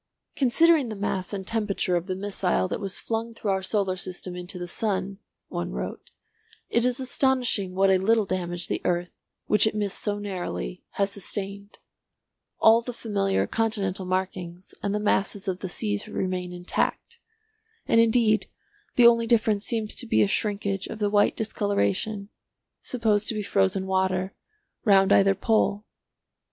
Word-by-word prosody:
"Considering 290 +1 +4
the 215 - -5
mass 195 -2 -2
and 195 -2 -4
temperature 205 -4 0
of 175 +1 -2
the 185 - -2
missile 190 -2 -1
that - - -3
was 195 -3 -2
flung 230 0 -3
through 210 -3 -2
our 190 0 0
solar 190 -1 0
system 185 -1 -5
into 180 +1 -6
the 175 0 -5
sun," 195 0 -2 0.3
one 85 0 -4
wrote, 60 0 -6 0.6
"it 235 - +2
is 250 +1 +2
astonishing 250 -7 +1
what 195 0 +4
a 190 - +4
little 220 +2 +3
damage 175 -2 -1
the - - -2
earth, 175 0 0 0.3
which 210 +1 +4
it 215 - -1
missed 205 -2 -2
so 205 -1 -1
narrowly, 175 - -5
has 200 0 0
sustained. 200 +1 -5 0.8
All 225 +1 +6
the 245 +1 -6
familiar 200 -4 0
continental 200 -5 -1
markings 185 -1 -3
and 200 0 -1
the - - 0
masses 205 -1 0
of 185 -1 -2
the 190 - -5
seas 205 +2 -2
remain 185 -3 -3
intact, 180 - -2 0.7
and 230 - +4
indeed 225 -2 +3 0.5
the 245 - +6
only 230 -1 +6
difference 220 -3 +2
seems 220 -3 -1
to 245 - -3
be - - +4
a - - +2
shrinkage 200 -2 -1
of - - -6
the 205 -1 0
white 205 -1 +3
discoloration 205 - -1 0.5
(supposed 220 -4 0
to 225 - -1
be 210 - -2
frozen 190 - +1
water) 190 0 0 0.5
round 195 -3 +5
either 195 0 +5
pole." 210 0 +1
200 Hz, 160 wpm, -26 LUFS, 185-220 Hz, 0.8 s, All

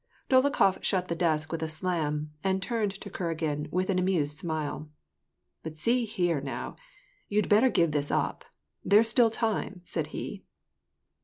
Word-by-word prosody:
Dolokhof 260 -8 +4
shut 185 -1 0
the 170 - 0
desk 155 -2 0
with 165 - -3
a 160 - -1
slam, 155 -2 -2
and 190 0 +1
turned 220 0 -1
to 200 +1 -9
Kuragin 160 -4 -2
with 185 +3 0
an 185 - +1
amused 170 -6 +1
smile: 155 -1 -3 0.2
— - - -54
" - - -53
But 160 -1 -7
see 235 +8 +1
here, 175 -9 0
now! 135 -1 -5 0.5
you'd 210 +1 +1
better 220 +5 +5
give 170 -8 +2
this 145 -1 0
up; - - -1 0.4
there's 215 +4 +5
still 230 0 +5
time," 220 -4 -2
said - - -2
he. - - -6
180 Hz, 165 wpm, -28 LUFS, 155-205 Hz, 0.5 s, better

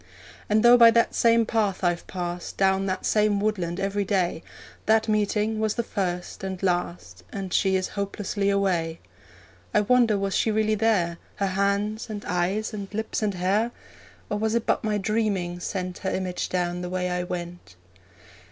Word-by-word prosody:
And 215 +1 +3
though 240 +1 +8
by 235 -1 +9
that 230 0 +3
same 230 -1 +4
path 210 -4 0
I've 175 -1 0
passed 175 -1 -5
Down 195 0 +2
that 185 -1 -2
same 210 -1 +2
woodland 190 -4 -1
every 200 +1 0
day, 185 -4 0 0.5
That 220 +1 +4
meeting 215 +1 +1
was 220 -1 0
the 235 - 0
first 180 -4 -3
and 190 -1 -5
last, 175 - -2
And 190 -2 -5
she 190 -1 +3
is 185 0 0
hopelessly 200 0 -2
away. 180 -5 0 0.8
I 210 - +5
wonder 230 -1 +3
was 195 -1 -1
she - - +2
really 215 0 +1
there 200 -6 +1 0.2
Her 200 - -1
hands, 200 +3 0
and 210 -1 -6
eyes, 190 +6 -1
and 200 -2 -6
lips, 220 +2 -3
and 205 -3 0
hair? 195 +6 +1 0.6
Or 210 - -2
was 220 +1 0
it 235 - 0
but - - +1
my 215 -1 0
dreaming 200 -4 -1
sent 180 0 -4
Her 190 - -2
image 185 -1 -2
down 180 -1 -1
the 180 - -4
way 180 0 -1
I 180 0 -1
went? 175 - -6
200 Hz, 175 wpm, -25 LUFS, 180-215 Hz, 0.8 s, by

